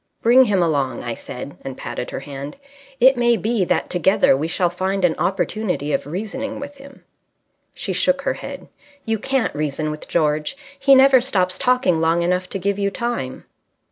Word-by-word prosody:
"Bring 250 +3 +6
him 195 -5 +2
along," 140 -5 -1
I 120 - -3
said, 125 +4 -8
and 135 -1 -7
patted 125 - -5
her - - -5
hand. 140 - -8 0.4
"It 260 +1 +6
may 240 -1 +3
be 220 +1 0
that - - -1
together 185 -3 +3
we 150 +4 -2
shall 175 +1 0
find 190 +1 0
an 170 - +3
opportunity 190 -6 -1
of - - -1
reasoning 220 - -4
with 285 +1 -8
him." 275 0 -14 0.7
She - - -3
shook - - +1
her - - 0
head. - - -8 0.4
"You 225 -1 -1
can't 265 +2 0
reason 150 +1 -2
with 150 - -8
George. 155 - 0 0.2
He 275 0 +6
never 265 -1 +6
stops 185 -8 0
talking 250 -10 +2
long 165 +1 +2
enough 180 +1 0
to - - -3
give 200 +2 -1
you 200 0 +1
time." 215 - -4
190 Hz, 180 wpm, -21 LUFS, 155-240 Hz, 0.7 s, Bring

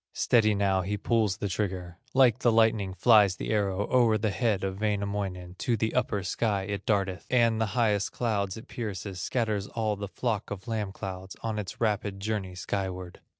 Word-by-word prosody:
Steady 110 -3 +3
now 100 -1 +2
he 100 +3 -2
pulls 105 -2 +1
the 105 - -2
trigger; 90 -3 -3 0.2
Like 130 -3 +5
the 120 - +3
lightning 110 -4 +2
flies 105 -1 +5
the - - -4
arrow 100 -2 0
O'er 120 -4 +4
the 105 0 0
head 105 -3 0
of 95 0 -3
Wainamoinen; 100 -4 -2
To 120 -2 +1
the 110 +1 -1
upper 100 -3 0
sky 100 +1 0
it 100 0 -5
darteth, 95 -3 0
And 115 -3 +3
the 110 - +2
highest 105 -4 +2
clouds 105 -4 -1
it 110 - -10
pierces, 100 -6 -5
Scatters 105 -3 -1
all 110 -2 -1
the 100 0 -5
flock 110 +1 -2
of 95 -2 -7
lamb 110 -4 -2
clouds, 95 -1 -7
On 110 -1 -2
its 100 - -6
rapid 105 -3 0
journey 100 -3 -3
skyward. 95 -1 -4
105 Hz, 185 wpm, -28 LUFS, 95-110 Hz, 0.2 s, Like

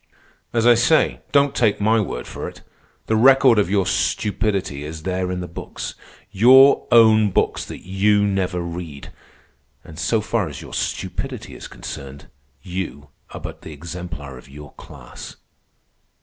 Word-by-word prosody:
As 115 -1 0
I 120 - +8
say, 125 +7 +2
don't 140 -1 +3
take 110 -4 +1
my 110 +2 +3
word 90 - -4
for - - -7
it. - - -11 0.4
The 110 - 0
record 130 0 +6
of 100 - +1
your 100 -1 +1
stupidity 95 -6 -1
is 80 +1 -8
there 90 0 -2
in 90 0 -3
the 90 - -5
books, 85 - -7 0.4
your 130 +7 +6
own 110 -2 +6
books - - 0
that - - -10
you 100 +2 +2
never 95 -3 -1
read. 85 -4 -7 0.7
And 80 0 -12
so 100 +6 +1
far 110 -4 -1
as 70 -3 -8
your - - -11
stupidity - - -4
is - - -9
concerned, 70 +2 -9 0.3
you 90 -7 -6 0.2
are - - -8
but - - -8
the 80 - -9
exemplar 75 -4 -8
of 65 - -17
your 75 0 -12
class. - - -12
95 Hz, 155 wpm, -21 LUFS, 80-110 Hz, 0.7 s, I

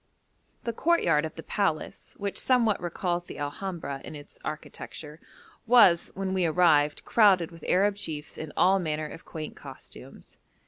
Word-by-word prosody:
The 235 - -2
courtyard 175 - +2
of 155 - -7
the 160 - -8
palace, 195 -7 -2
which 200 -1 -2
somewhat 235 -7 +2
recalls 175 0 -2
the - - -9
Alhambra 145 -2 -5
in - - -8
its 145 0 -12
architecture, 155 0 -7 0.5
was, 220 -8 +6
when 190 -1 -2
we 185 -1 +1
arrived, 155 -3 +3
crowded 190 -7 +4
with 165 -2 -14
Arab 200 +2 +2
chiefs 155 -7 -5
in 155 -1 -7
all 190 +2 +4
manner 155 -3 -2
of 160 - -11
quaint 155 -1 -7
costumes. - - -12
175 Hz, 150 wpm, -27 LUFS, 155-195 Hz, 0.5 s, was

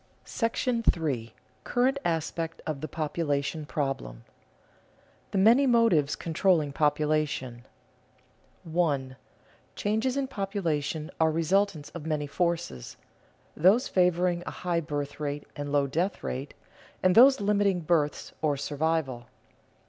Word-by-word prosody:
§ 230 -2 0
III. 115 -5 -3 0.3
CURRENT 260 +3 +1
ASPECT 165 0 -2
OF 150 -4 -4
THE 155 - -3
POPULATION 150 -2 -2
PROBLEM 100 - -3
[Sidenote: - - -34
The - - -3
many 235 +8 +5
motives 225 - +3
controlling 165 -3 +1
population] 150 -5 0 1.0
1. 150 -6 -1 0.6
_Changes 220 +6 0
in 275 - 0
population 170 - -2
are 160 0 +4
resultants 165 0 0
of 160 -2 -8
many 150 -2 -1
forces: 170 - -2 0.6
those 195 - +4
favoring 180 -1 +2
a - - -7
high 170 -1 +1
birth 145 -2 -4
rate 145 -1 -3
and 145 0 -5
low 145 -1 +3
death 170 +8 -2
rate, 135 +3 -5 0.5
and 185 -1 +5
those 265 +5 +7
limiting 200 -2 +1
births 155 -3 0
or 150 -3 +1
survival. 145 -4 -2
160 Hz, 120 wpm, -28 LUFS, 145-190 Hz, 1.0 s, those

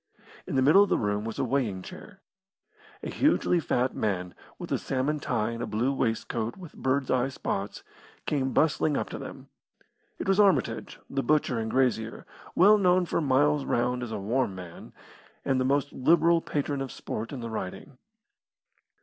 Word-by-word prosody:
In - - -3
the 130 - +3
middle 155 +9 +7
of 205 - +3
the - - +3
room 105 0 -1
was 115 - -5
a - - 0
weighing 120 -8 -1
chair. 195 - -11 0.8
A - - -4
hugely 275 - +2
fat 130 -4 0
man, 90 -4 -2 0.2
with - - -8
a - - +1
salmon 135 +3 -1
tie 115 -5 -1
and 115 0 -5
a - - -3
blue 120 +6 0
waistcoat 115 -2 -2
with 180 -5 -11
birds' 130 0 -1
eye 130 0 +2
spots, 100 -6 -4 0.4
came 135 -3 0
bustling 155 -1 +2
up - - -2
to - - -6
them. - - -9 0.7
It - - -5
was 195 +1 +3
Armitage, 200 -2 +2
the 135 - -2
butcher 135 -3 +1
and 110 0 -3
grazier, 120 -3 0 0.3
well 210 +4 +6
known 180 -1 +3
for 170 - -1
miles 145 +1 +2
round 125 0 0
as 120 -2 -5
a 110 - -3
warm 105 +1 -1
man, 90 -2 -10 0.5
and 130 -1 +1
the - - +1
most 140 +1 +1
liberal 165 +4 +4
patron 145 -2 -2
of 135 -3 -4
sport 110 +1 -5
in 140 - -5
the 115 -1 -5
Riding. 110 +6 -6
130 Hz, 180 wpm, -27 LUFS, 115-150 Hz, 0.8 s, middle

